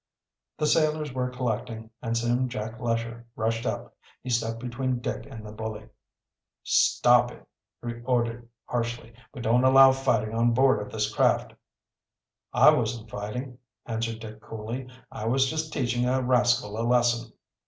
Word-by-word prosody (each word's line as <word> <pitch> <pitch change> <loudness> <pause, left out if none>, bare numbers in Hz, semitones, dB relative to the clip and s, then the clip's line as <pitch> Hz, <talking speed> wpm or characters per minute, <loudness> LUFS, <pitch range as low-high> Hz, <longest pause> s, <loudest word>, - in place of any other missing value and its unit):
The 150 - 0
sailors 155 -2 +2
were 125 -1 -1
collecting, 115 -2 -4
and 115 -1 -1
soon 120 +2 +1
Jack 110 -1 -5
Lesher 115 0 -3
rushed 115 +2 -1
up. - - -4 0.3
He 125 - -4
stepped 115 -1 0
between 125 +2 -2
Dick 120 - -4
and 110 -1 -9
the 105 - -8
bully. 110 0 -6 0.7
"Stop - - +4
it!" - - -14 0.4
he 120 0 -5
ordered 120 -1 -1 0.2
harshly. 120 -1 -3 0.2
"We 130 - -8
don't 120 +2 +3
allow 135 0 +8
fighting 125 -5 0
on 115 +1 +2
board 130 -4 +4
of 105 - -7
this 105 -1 -1
craft." - - +2 1.0
"I - - +7
wasn't 115 -1 -2
fighting," 125 +5 -5 0.3
answered 115 0 -3
Dick 110 -1 -9
coolly. 115 +5 -6 0.2
"I 110 - -6
was 135 +3 +3
just 155 0 -3
teaching 125 -3 0
a 130 +1 +2
rascal 125 -4 +2
a - - 0
lesson." 120 -1 +2
120 Hz, 155 wpm, -27 LUFS, 115-125 Hz, 1.0 s, allow